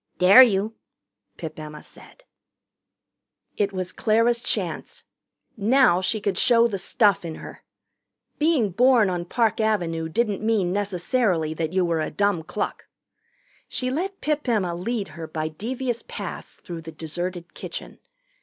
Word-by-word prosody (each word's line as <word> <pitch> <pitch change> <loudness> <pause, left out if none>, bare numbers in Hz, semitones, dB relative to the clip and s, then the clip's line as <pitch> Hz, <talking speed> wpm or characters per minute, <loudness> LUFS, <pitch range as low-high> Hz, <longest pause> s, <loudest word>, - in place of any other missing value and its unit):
"Dare 195 +7 +9
you!" 215 -3 +3 0.6
Pip 160 -2 -7
Emma 150 0 -8
said. - - -16 1.3
It 200 -1 0
was 185 -1 -3
Clara's 230 +2 +2
chance. - - -3 0.5
Now 220 -4 +4
she 215 +4 0
could 200 -2 -1
show 235 -2 +5
the 200 -4 -3
stuff 200 +1 +2
in 165 -2 -5
her. - - -10 0.8
Being 295 - +2
born 235 -1 +4
on 175 -1 -3
Park 225 +2 +1
Avenue 170 -7 0
didn't 210 +2 0
mean 215 -5 +1
necessarily 190 -4 0
that 160 +1 -3
you 185 -1 +2
were 165 -1 0
a - - -2
dumb 200 0 +1
cluck. 160 - -4 0.8
She 255 0 -1
let 380 +8 -3
Pip 300 -3 -1
Emma 195 -7 +1
lead 200 +3 -3
her 160 +1 -8
by 155 0 -3
devious 240 +8 -3
paths - - -7
through 170 -2 -7
the 160 0 -9
deserted 170 +3 -5
kitchen. - - -8
200 Hz, 145 wpm, -24 LUFS, 170-235 Hz, 1.3 s, Dare